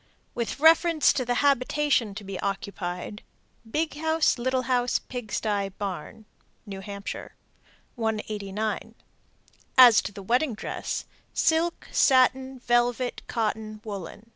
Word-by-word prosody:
With 235 +2 -3
reference 325 0 +5
to 255 - -1
the 245 +1 0
habitation 275 -4 +2
to 215 - -7
be 195 -1 -6
occupied: 195 -1 -4 0.5
Big 310 +6 -1
house, 320 -3 +2
little 260 +1 0
house, 245 0 +1
pig 245 -4 -8
sty, 205 -2 -1
barn. 195 +2 -6 0.4
New 195 -2 -7
Hampshire. 200 0 -7 0.6
189. 215 -2 -3 0.8
As 245 -4 +9
to - - -6
the 200 -1 -10
wedding 245 +4 +1
dress: - - -4 0.3
Silk, 325 +2 +1
satin, 260 0 +3
velvet, 245 0 0
cotton, 215 -1 -2
woolen. 205 -1 -7
230 Hz, 115 wpm, -26 LUFS, 205-260 Hz, 0.8 s, As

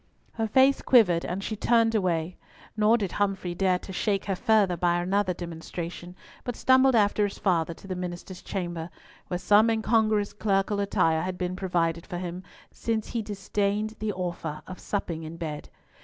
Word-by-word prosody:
Her 225 -1 -2
face 265 +5 +4
quivered, 180 -10 +4
and 185 +3 -3
she 215 - -3
turned 230 +1 +3
away; 180 -4 0 0.4
nor 215 +2 +4
did 200 -6 -2
Humfrey 195 -3 -1
dare 185 0 +2
to 190 - -9
shake 195 +1 0
her 195 - -1
further 210 -3 +3
by 175 0 +1
another 190 +2 +1
demonstration, 175 +1 -7 0.3
but 245 -2 -4
stumbled 260 0 +4
after 210 -1 +3
his 205 - -2
father 170 -4 +1
to - - -16
the 185 - -3
minister's 180 +1 -6
chamber, 175 -3 -4 0.4
where 180 - -2
some 205 +5 +4
incongruous 220 -2 +2
clerical 200 -1 0
attire 165 -5 +2
had 185 0 -3
been 180 0 -2
provided 170 -3 -1
for 180 - -5
him, 175 0 -5 0.3
since 225 -2 -2
he 235 - -2
disdained 205 +1 -2
the 215 0 -1
offer 170 -4 -4
of 185 - -9
supping 170 -5 -3
in 160 +1 -8
bed. 155 -3 -5
190 Hz, 170 wpm, -27 LUFS, 175-215 Hz, 0.4 s, face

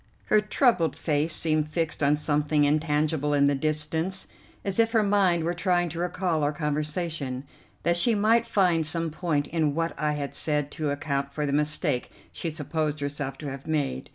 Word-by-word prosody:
Her 215 - +3
troubled 210 - +2
face 155 +1 0
seemed 155 -1 0
fixed 160 0 -2
on 145 +1 +4
something 150 0 +1
intangible 150 0 +1
in 140 0 +4
the 140 - +3
distance, 155 +5 -1 0.4
as 195 +2 -1
if 225 0 +3
her 220 -2 +4
mind 195 -5 +2
were 170 +2 0
trying 175 -1 +1
to 170 - -6
recall 175 -2 -1
our 145 0 +1
conversation, 150 -3 -2 0.4
that 170 0 +2
she 225 +6 +2
might 225 +3 +3
find 180 -7 +2
some 165 +1 0
point 155 -3 -1
in 155 -2 0
what 165 0 -1
I 150 -1 +1
had 145 -1 -4
said 150 -2 +1
to 155 -2 -2
account 140 -1 -2
for 150 - -1
the 140 - -1
mistake 150 -2 +1 0.2
she 170 - -3
supposed 155 -1 -2
herself 145 -1 -4
to 145 -3 -6
have 135 0 -9
made. 145 - -2
155 Hz, 180 wpm, -26 LUFS, 145-170 Hz, 0.4 s, on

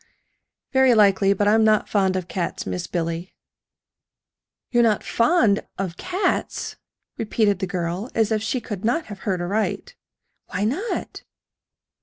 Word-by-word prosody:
"Very 265 -2 +5
likely; 200 -2 +4
but 205 +1 +1
I'm 220 +1 +5
not 215 -1 +3
fond 190 -3 +1
of 185 -2 -3
cats, 180 -2 -3
Miss 175 -1 -3
Billy." 170 +1 -3 1.4
"You're 240 - +4
not 220 -3 +2
fond 230 - +3 0.2
of 185 -3 -3
cats!" 370 - -2 0.4
repeated 210 -3 +1
the 190 - -2
girl, 180 +5 -3
as 225 -1 +2
if 215 -1 +1
she 250 +4 -1
could 205 -5 -6
not 305 +9 +1
have 205 -2 -9
heard 185 -2 0
aright. 205 +5 -2 0.5
"Why 185 - -3
not?" 365 - -3
205 Hz, 140 wpm, -23 LUFS, 185-230 Hz, 1.4 s, Very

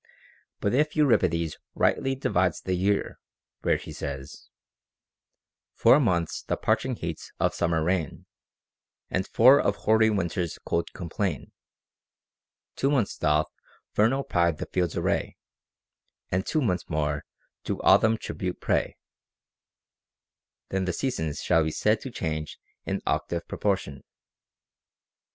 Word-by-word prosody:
But 100 - +1
if 150 +3 +2
Euripides 90 - +2 0.2
rightly 135 0 +1
divides 90 -9 +1
the 95 - -2
year, 100 +3 0 0.4
where - - +2
he - - -9
says, 70 0 -7 1.3
Four 140 - +6
months 85 - 0
the - - -2
parching - - 0
heats - - -6
of - - +2
summer 85 -2 0
reign, 85 -3 -1 0.9
And 95 +1 -1
four 130 +5 +6
of 100 - +1
hoary 110 +1 +3
winter's 90 -4 -1
cold 85 0 -1
complain; 90 - -3 1.2
Two 135 - +1
months 130 -8 +1
doth 75 0 +1 0.4
vernal 120 +6 +2
pride 85 - +1
the - - -4
fields 90 -3 -1
array, - - -1 0.9
And 95 +1 0
two 155 - +1
months 90 -9 -1
more 75 -2 -1 0.4
to - - -2
autumn 110 +1 +5
tribute 90 -4 -4
pay, - - 0 1.7
then 95 -1 -1
the 90 - -1
seasons 80 - -2
shall 80 -2 +3
be 80 - 0
said 105 +7 +1
to 135 - -6
change 80 -8 -4 0.3
in - - -1
octave 85 -1 -1
pro - - -7
portion. 95 -9 -1
90 Hz, 125 wpm, -26 LUFS, 80-110 Hz, 1.7 s, Four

